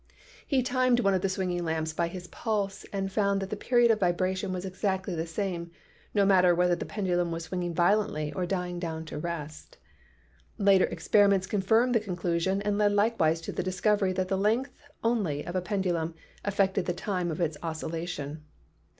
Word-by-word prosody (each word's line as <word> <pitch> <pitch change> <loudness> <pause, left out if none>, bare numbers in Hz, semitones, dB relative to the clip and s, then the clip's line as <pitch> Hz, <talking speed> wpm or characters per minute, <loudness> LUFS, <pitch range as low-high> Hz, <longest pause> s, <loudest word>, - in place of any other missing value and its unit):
He 265 -3 +2
timed 255 -1 +2
one 195 -3 +3
of 185 - +1
the 195 - 0
swinging 180 -2 -1
lamps 160 -1 -1
by 170 +1 0
his 175 +1 -7
pulse 200 0 -3
and 195 -1 -2
found 200 0 +1
that 195 0 -5
the - - -1
period 240 +2 +3
of 215 - +1
vibration 185 +1 0
was 185 0 -4
exactly 190 0 -2
the 165 0 -3
same, 170 -1 -3 0.4
no 200 -2 +3
matter 180 -3 +5
whether 180 0 +3
the - - -6
pendulum 175 -4 0
was 165 0 -3
swinging 175 0 -3
violently 175 -4 +1
or 180 -2 -2
dying 180 -1 -2
down 160 -2 -4
to 155 - -6
rest. 155 -2 -6 0.8
Later 200 -3 +5
experiments 200 -2 +3
confirmed 220 +6 +2
this 225 -3 +2
conclusion 180 +1 -1
and 205 0 0
led 205 -1 +3
likewise 200 -7 +2
to - - -5
the - - -2
discovery 190 +2 +1
that 185 0 -1
the 190 0 0
length 225 +7 +1 0.3
only 205 -11 0
of 175 - -5
a 185 - +1
pen 195 +1 -1
dulum 170 -3 -1 0.3
affected 195 -3 +1
the 175 - +1
time 180 -1 -2
of 160 - -4
its 160 -3 0
oscillation. 160 -2 -4
185 Hz, 185 wpm, -28 LUFS, 170-205 Hz, 0.8 s, matter